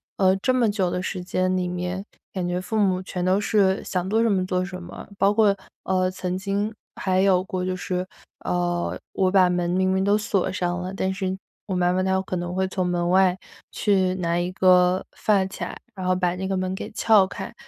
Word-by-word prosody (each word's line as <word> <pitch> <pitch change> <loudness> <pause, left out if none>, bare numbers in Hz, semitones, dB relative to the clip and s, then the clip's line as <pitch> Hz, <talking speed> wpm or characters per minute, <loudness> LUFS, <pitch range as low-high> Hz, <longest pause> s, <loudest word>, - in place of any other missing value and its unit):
呃， 190 -1 +4
这 255 +6 +1
么 235 -4 +2
久 190 -4 0
的 180 +1 -2
时 185 0 -4
间 185 +1 0
里 180 -1 -1
面， 180 +2 -3 0.3
感 185 -2 -2
觉 180 +1 -1
父 185 +4 -3
母 190 -2 +2
全 180 -1 -4
都 190 +2 +2
是 195 -2 +2
想 185 0 -2
做 225 +2 +2
什 230 - +3
么 185 -2 +1
做 185 -1 0
什 185 -1 -6
么， 175 - -9
包 200 +1 +4
括， 210 -2 +4 0.3
呃， 185 -1 +1
曾 185 0 -3
经 200 +3 -2 0.2
还 185 -1 0
有 185 -2 +4
过 185 -1 -3
就 185 - -1
是 185 0 -3 0.4
呃， 175 -1 -1
我 185 -1 +1
把 185 -2 +5
门 175 -1 0
明 185 +1 +2
明 190 - +1
都 205 +1 +4
锁 205 -3 0
上 180 -1 -2
了， 185 +1 -5
但 190 -1 -1
是 190 0 -2 0.3
我 190 - -3
妈 180 0 +2
妈 185 +1 +1
她 190 - 0
有 190 0 +2
可 185 -1 -4
能 175 +1 -4
会 190 0 +1
从 185 -2 -1
门 175 0 0
外 185 0 +4 0.4
去 190 -3 +2
拿 170 -1 0
一 175 +1 -1
个 185 0 +4
发 200 -3 +2
卡， 190 - -6 0.2
然 185 -2 -5
后 185 - +3
把 180 -1 0
那 190 - -3
个 195 - -1
门 185 0 -1
给 - - -5
撬 215 -3 +4
开， 195 +2 -7
185 Hz, 240 characters per minute, -24 LUFS, 180-195 Hz, 0.4 s, 把